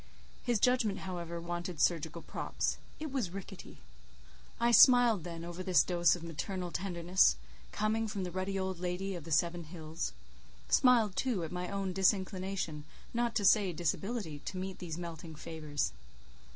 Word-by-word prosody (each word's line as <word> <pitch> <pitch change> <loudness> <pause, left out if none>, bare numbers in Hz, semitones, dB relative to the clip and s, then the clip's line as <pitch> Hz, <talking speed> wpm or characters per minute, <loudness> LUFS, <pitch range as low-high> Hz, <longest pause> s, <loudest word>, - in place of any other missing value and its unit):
His 240 -3 +1
judgment, 245 -4 +2
however, 170 -2 -5
wanted 175 0 -4
surgical 165 -1 +1
props; - - -2 0.2
it 310 -2 -5
was 255 -9 -1
rickety. 195 +1 -9 0.8
I 235 0 +3
smiled 240 - +7
then 170 -1 -6
over 175 +1 -6
this 185 -1 +4
dose 175 -2 +3
of 175 - -9
maternal 175 +3 -4
tenderness, 175 - +3 0.4
coming 220 +1 0
from 200 -2 -3
the 180 - -4
ruddy 190 +2 -2
old 190 -2 -2
lady 180 +2 -2
of 170 -4 -7
the 165 - -8
Seven 170 +2 +1
Hills; 160 - -5 0.6
smiled, 230 -6 +5
too, 235 -10 0
at 165 - -5
my 180 0 -3
own 195 -2 -2
disinclination, 190 -4 0 0.3
not 235 -1 0
to 205 - +1
say 195 -1 +5
disability, 175 0 -2
to 190 - -4
meet 190 0 -5
these 165 -3 -5
melting 165 -2 -7
favours. 155 -2 -3
180 Hz, 155 wpm, -33 LUFS, 170-200 Hz, 0.8 s, smiled